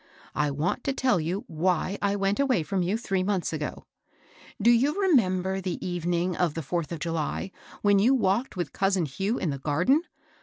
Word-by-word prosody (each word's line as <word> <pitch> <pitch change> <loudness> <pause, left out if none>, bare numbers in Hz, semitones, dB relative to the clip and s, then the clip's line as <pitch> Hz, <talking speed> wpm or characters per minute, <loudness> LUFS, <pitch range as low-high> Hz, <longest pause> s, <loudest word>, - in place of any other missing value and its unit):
I 150 0 +1
want 150 - -1
to 275 - +1
tell 260 -8 +2
you 175 +6 -2
why 180 +4 -1
I 200 0 +1
went 195 +2 0
away 260 - +2
from 185 +5 -1
you 185 +5 0
three 195 -5 -1
months 185 -3 -1
ago. 150 -2 -4 0.7
Do 230 +4 +5
you 265 +6 +3
r^nember 190 - +2
the 185 -1 -3
evening 175 0 -1
of 170 -3 0
the 165 - -3
fourth 170 +3 -2
of 170 - -3
July, 165 +3 -3 0.3
when 205 -1 +5
you 245 +7 +4
walked 220 0 0
with 170 -6 -3
cousin 195 -3 +1
Hugh 195 - -2
in 165 - -1
the 140 - -4
garden? 175 - +2
185 Hz, 190 wpm, -27 LUFS, 165-205 Hz, 0.7 s, Do